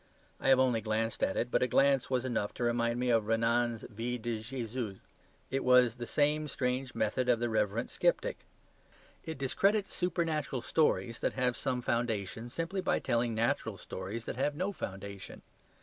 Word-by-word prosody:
I -, -, +1 dB
have 135 Hz, -1 st, +6 dB
only 125 Hz, -4 st, +3 dB
glanced 110 Hz, +1 st, -1 dB
at 95 Hz, -, +1 dB
it, 120 Hz, -, -1 dB
but -, -, +2 dB
a 125 Hz, -, +3 dB
glance 135 Hz, +1 st, +3 dB
was 130 Hz, -1 st, 0 dB
enough 115 Hz, -5 st, -1 dB
to -, -, -3 dB
remind 120 Hz, 0 st, +1 dB
me 125 Hz, 0 st, +1 dB
of 115 Hz, -2 st, +2 dB
Renan's 115 Hz, +1 st, +1 dB
"Vie 120 Hz, +2 st, -4 dB
de 115 Hz, -1 st, -3 dB
Jesus." 115 Hz, -3 st, -4 dB, 0.5 s
It 135 Hz, +1 st, 0 dB
has 125 Hz, -2 st, +5 dB
the 120 Hz, -1 st, -5 dB
same 150 Hz, +3 st, +2 dB
strange 125 Hz, -1 st, -2 dB
method 125 Hz, +4 st, 0 dB
of 120 Hz, -, +5 dB
the 120 Hz, 0 st, 0 dB
reverent 110 Hz, +1 st, 0 dB
sceptic. -, -, +1 dB, 0.8 s
It 160 Hz, -2 st, -5 dB
discredits 195 Hz, +10 st, +1 dB
supernatural 160 Hz, -7 st, -1 dB
stories 125 Hz, -7 st, +1 dB
that -, -, 0 dB
have 125 Hz, -2 st, +1 dB
some 125 Hz, -2 st, -2 dB
foundation, 115 Hz, -1 st, -1 dB
simply 165 Hz, +8 st, -2 dB
by -, -, +1 dB
telling 120 Hz, -2 st, 0 dB
natural 115 Hz, +2 st, 0 dB
stories 100 Hz, +5 st, -6 dB
that -, -, -4 dB
have 145 Hz, +2 st, 0 dB
no 185 Hz, +6 st, -1 dB
foundation. 100 Hz, -, -7 dB
120 Hz, 175 wpm, -32 LUFS, 115-135 Hz, 0.8 s, have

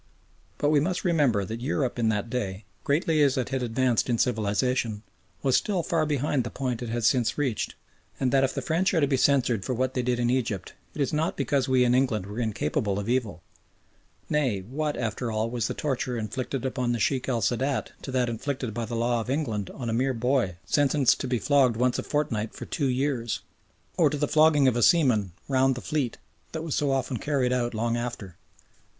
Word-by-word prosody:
But 145 Hz, -, +1 dB
we 150 Hz, -1 st, +4 dB
must 180 Hz, +6 st, -1 dB
remember 140 Hz, -, +2 dB
that 115 Hz, +5 st, -6 dB
Europe 130 Hz, -2 st, -1 dB
in 115 Hz, -1 st, +2 dB
that 105 Hz, 0 st, -1 dB
day, 100 Hz, -5 st, -3 dB, 0.2 s
greatly 155 Hz, +2 st, +2 dB
as 140 Hz, -2 st, +3 dB
it 130 Hz, -, -1 dB
had 135 Hz, -1 st, -1 dB
advanced 125 Hz, 0 st, +1 dB
in 120 Hz, -, +2 dB
civilisation, 110 Hz, 0 st, 0 dB, 0.4 s
was 135 Hz, -2 st, +3 dB
still 190 Hz, -5 st, +1 dB
far 160 Hz, -2 st, 0 dB
behind 145 Hz, -2 st, 0 dB
the 120 Hz, -, -4 dB
point 125 Hz, -1 st, -3 dB
it 120 Hz, -, -4 dB
has 115 Hz, -1 st, -1 dB
since 120 Hz, 0 st, +2 dB
reached, 135 Hz, -7 st, -1 dB, 0.4 s
and 130 Hz, -2 st, +1 dB
that 135 Hz, -1 st, +4 dB
if 135 Hz, -, +2 dB
the -, -, -3 dB
French 180 Hz, +4 st, +1 dB
are -, -, +4 dB
to 145 Hz, -, +4 dB
be 135 Hz, -1 st, +1 dB
censured 130 Hz, -6 st, +2 dB
for 125 Hz, -, -2 dB
what 130 Hz, +2 st, 0 dB
they 125 Hz, -, 0 dB
did 125 Hz, 0 st, 0 dB
in 120 Hz, 0 st, +1 dB
Egypt 120 Hz, -7 st, -2 dB, 0.2 s
it 150 Hz, -, -3 dB
is 140 Hz, -, 0 dB
not 155 Hz, +2 st, 0 dB
because 140 Hz, -1 st, 0 dB
we 130 Hz, -1 st, +4 dB
in 120 Hz, 0 st, +3 dB
England 125 Hz, -6 st, +1 dB
were 105 Hz, +4 st, -6 dB
incapable 105 Hz, -2 st, -1 dB
of 100 Hz, 0 st, -3 dB
evil; 115 Hz, -8 st, -1 dB, 0.8 s
nay, 130 Hz, -10 st, 0 dB
what, 145 Hz, +9 st, -3 dB
after 115 Hz, +1 st, -2 dB
all, 110 Hz, +1 st, -1 dB
was 120 Hz, -2 st, -1 dB
the -, -, -4 dB
torture 135 Hz, -3 st, -2 dB
inflicted 125 Hz, +4 st, -3 dB
upon 125 Hz, -2 st, -1 dB
the 120 Hz, -, -2 dB
Sheikh 130 Hz, +4 st, 0 dB
el 120 Hz, -4 st, 0 dB
Sadat 130 Hz, +5 st, 0 dB
to 135 Hz, -, -6 dB
that 125 Hz, -1 st, +1 dB
inflicted 125 Hz, 0 st, -3 dB
by 120 Hz, 0 st, -3 dB
the 115 Hz, +2 st, -5 dB
law 120 Hz, 0 st, +1 dB
of 115 Hz, -, -7 dB
England 115 Hz, -, -1 dB
on 125 Hz, -, -6 dB
a 115 Hz, -, -1 dB
mere 130 Hz, +3 st, +1 dB
boy 120 Hz, -6 st, +1 dB
sentenced 145 Hz, -2 st, +3 dB
to -, -, -3 dB
be 125 Hz, -1 st, +1 dB
flogged 130 Hz, -2 st, +3 dB
once 125 Hz, +1 st, +1 dB
a -, -, 0 dB
fortnight 115 Hz, -8 st, -2 dB
for -, -, -7 dB
two 145 Hz, -4 st, -1 dB
years? 125 Hz, -3 st, -1 dB, 0.6 s
or -, -, +5 dB
to 150 Hz, -, -3 dB
the 145 Hz, +1 st, 0 dB
flogging 155 Hz, -3 st, +5 dB
of 125 Hz, -, +3 dB
a 120 Hz, -, +1 dB
seaman 120 Hz, -, +3 dB
"round 135 Hz, -1 st, +3 dB
the -, -, -5 dB
fleet" 140 Hz, -3 st, -2 dB, 0.4 s
that 160 Hz, 0 st, -3 dB
was 160 Hz, -4 st, -3 dB
so 145 Hz, -, +1 dB
often 135 Hz, -2 st, 0 dB
carried 130 Hz, -2 st, 0 dB
out 120 Hz, -2 st, -1 dB
long 115 Hz, +1 st, 0 dB
after? 120 Hz, -7 st, -5 dB
125 Hz, 215 wpm, -26 LUFS, 115-140 Hz, 0.8 s, or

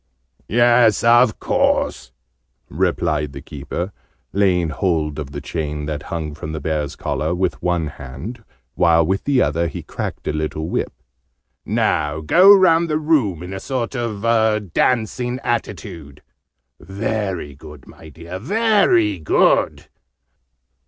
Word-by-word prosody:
"Yes, 120 Hz, -2 st, +4 dB
of 120 Hz, 0 st, +4 dB
course," 60 Hz, -1 st, 0 dB, 0.6 s
replied 80 Hz, -4 st, -1 dB
the 70 Hz, -, -8 dB
Keeper, 75 Hz, +7 st, -5 dB, 0.4 s
laying 90 Hz, -4 st, +2 dB
hold 80 Hz, -3 st, -1 dB
of 70 Hz, -3 st, -5 dB
the 70 Hz, 0 st, -6 dB
chain, 75 Hz, -1 st, -4 dB
that 75 Hz, -1 st, -4 dB
hung 80 Hz, -3 st, -4 dB
from 75 Hz, +1 st, -7 dB
the 80 Hz, -, -4 dB
Bear's 75 Hz, -1 st, -2 dB
collar, 80 Hz, +3 st, -2 dB
with 90 Hz, 0 st, -1 dB
one 90 Hz, -2 st, 0 dB
hand, 75 Hz, -, -8 dB, 0.3 s
while 85 Hz, -2 st, +3 dB
with 95 Hz, +4 st, -1 dB
the 140 Hz, -3 st, +3 dB
other 85 Hz, +4 st, 0 dB
he -, -, -7 dB
cracked -, -, -6 dB
a -, -, 0 dB
little 80 Hz, 0 st, -3 dB
whip. -, -, -2 dB, 0.8 s
"Now 75 Hz, 0 st, 0 dB
go 180 Hz, -, +6 dB
round 170 Hz, -4 st, +5 dB
the 150 Hz, -, +1 dB
room 135 Hz, -, +1 dB
in 90 Hz, +2 st, -7 dB
a 95 Hz, -, -5 dB
sort 130 Hz, +3 st, -3 dB
of 115 Hz, -4 st, -3 dB
a 110 Hz, -2 st, +3 dB
dancing 120 Hz, +5 st, -1 dB
attitude. 85 Hz, -, -4 dB, 0.6 s
Very 95 Hz, -4 st, -3 dB
good, 75 Hz, 0 st, -13 dB
my 80 Hz, -, -14 dB
dear, 85 Hz, +4 st, -8 dB
very 160 Hz, -, +2 dB
good. 75 Hz, -, +2 dB
90 Hz, 135 wpm, -20 LUFS, 75-115 Hz, 0.8 s, go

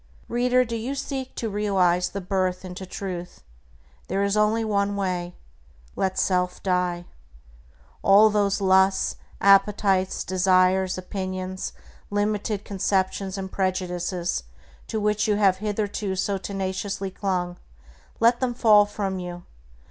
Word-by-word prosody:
Reader, 250 Hz, +1 st, +2 dB
do 230 Hz, -1 st, -4 dB
you 240 Hz, +5 st, -3 dB
seek 265 Hz, -1 st, -5 dB
to 230 Hz, -, -3 dB
realize 190 Hz, -4 st, +1 dB
the 200 Hz, -, -5 dB
birth 185 Hz, 0 st, -1 dB
into 185 Hz, +1 st, -7 dB
Truth? 180 Hz, -2 st, -6 dB, 0.6 s
There 195 Hz, -, 0 dB
is 200 Hz, 0 st, +1 dB
only 215 Hz, +2 st, +2 dB
one 200 Hz, -1 st, 0 dB
way: 180 Hz, -3 st, -2 dB, 0.6 s
Let 190 Hz, -1 st, -1 dB
self 180 Hz, -1 st, 0 dB
die. 180 Hz, -2 st, 0 dB, 1.0 s
All 210 Hz, +2 st, +6 dB
those 200 Hz, -1 st, +1 dB
lusts, 190 Hz, 0 st, +3 dB, 0.2 s
appetites, 195 Hz, -1 st, +3 dB
desires, 185 Hz, 0 st, +2 dB
opinions, 185 Hz, 0 st, -4 dB, 0.4 s
limited 205 Hz, 0 st, -1 dB
conceptions 195 Hz, 0 st, -1 dB
and 190 Hz, -1 st, -5 dB
prejudices 180 Hz, -2 st, -1 dB, 0.5 s
to 220 Hz, -, -2 dB
which 210 Hz, 0 st, +1 dB
you 210 Hz, -, +2 dB
have 195 Hz, -3 st, +3 dB
hitherto 205 Hz, -1 st, -2 dB
so 195 Hz, +1 st, -1 dB
tenaciously 195 Hz, 0 st, -3 dB
clung, 180 Hz, -2 st, -2 dB, 0.6 s
let 235 Hz, +1 st, +4 dB
them 250 Hz, -2 st, -1 dB
fall 210 Hz, -4 st, +6 dB
from 195 Hz, -2 st, -3 dB
you. 175 Hz, -1 st, -7 dB
195 Hz, 125 wpm, -24 LUFS, 185-210 Hz, 1.0 s, All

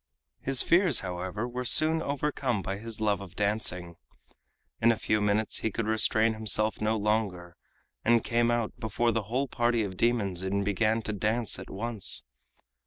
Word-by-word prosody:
His 135 Hz, -1 st, 0 dB
fears, 175 Hz, +1 st, +4 dB
however, 95 Hz, +4 st, -4 dB
were 125 Hz, +1 st, -4 dB
soon 160 Hz, +5 st, +5 dB
overcome 140 Hz, -, -2 dB
by 95 Hz, +1 st, -4 dB
his 115 Hz, 0 st, -6 dB
love 105 Hz, -3 st, 0 dB
of 95 Hz, -3 st, -11 dB
dancing. 90 Hz, -5 st, -1 dB, 0.8 s
In 115 Hz, +1 st, +5 dB
a 115 Hz, -, -1 dB
few 105 Hz, 0 st, 0 dB
minutes 105 Hz, +1 st, 0 dB
he 110 Hz, -, -1 dB
could 110 Hz, +2 st, -3 dB
restrain 110 Hz, +1 st, +2 dB
himself 110 Hz, -1 st, -1 dB
no 110 Hz, +1 st, +1 dB
longer, 100 Hz, -5 st, -1 dB, 0.5 s
and 115 Hz, -1 st, +3 dB
came 120 Hz, 0 st, +1 dB
out 120 Hz, -2 st, 0 dB
before 115 Hz, +2 st, 0 dB
the 115 Hz, 0 st, 0 dB
whole 130 Hz, +5 st, -1 dB
party 120 Hz, -2 st, +1 dB
of 95 Hz, -3 st, -6 dB
demons 105 Hz, -7 st, 0 dB
and 100 Hz, +1 st, -1 dB
began 110 Hz, +3 st, +1 dB
to 110 Hz, -, -3 dB
dance 110 Hz, +3 st, 0 dB
at -, -, -10 dB
once. 110 Hz, 0 st, -1 dB
110 Hz, 170 wpm, -28 LUFS, 100-120 Hz, 0.8 s, soon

